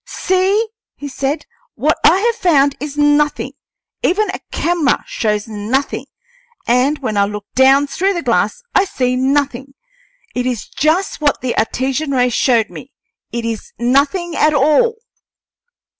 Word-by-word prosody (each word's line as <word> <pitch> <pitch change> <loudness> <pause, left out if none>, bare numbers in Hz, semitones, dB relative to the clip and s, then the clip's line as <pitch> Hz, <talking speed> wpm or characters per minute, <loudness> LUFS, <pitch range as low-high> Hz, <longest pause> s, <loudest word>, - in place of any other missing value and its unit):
"See!" 380 +4 0 0.3
he 285 - -7
said. 280 +2 -3 0.3
"What - - +1
I 380 - +5
have 470 +2 +2
found 295 -10 +2
is 295 0 -6
nothing; 295 -2 +2 0.5
even 395 +2 +1
a - - -6
camera 335 -5 +1
shows 210 -1 -2
nothing, 220 +6 -2 0.6
and 255 +5 +2
when 215 -4 -2
I 200 - +4
look 210 0 -6
down 270 +2 +5
through 380 +7 -1
the 340 - -3
glass 485 - 0
I 395 - +4
see 255 -8 -1
nothing. 275 0 -1 0.6
It 250 0 -1
is 245 -4 -3
just 320 +4 0
what 290 -2 +1
the 255 -2 -2
Artesian 265 +6 -1
ray 250 -1 +2
showed 235 -2 +2
me; 270 - -11 0.4
it 235 -1 -3
is 225 -2 -5
nothing 285 - +1
at 305 0 +3
all!" 310 - +3
280 Hz, 145 wpm, -17 LUFS, 250-330 Hz, 0.6 s, I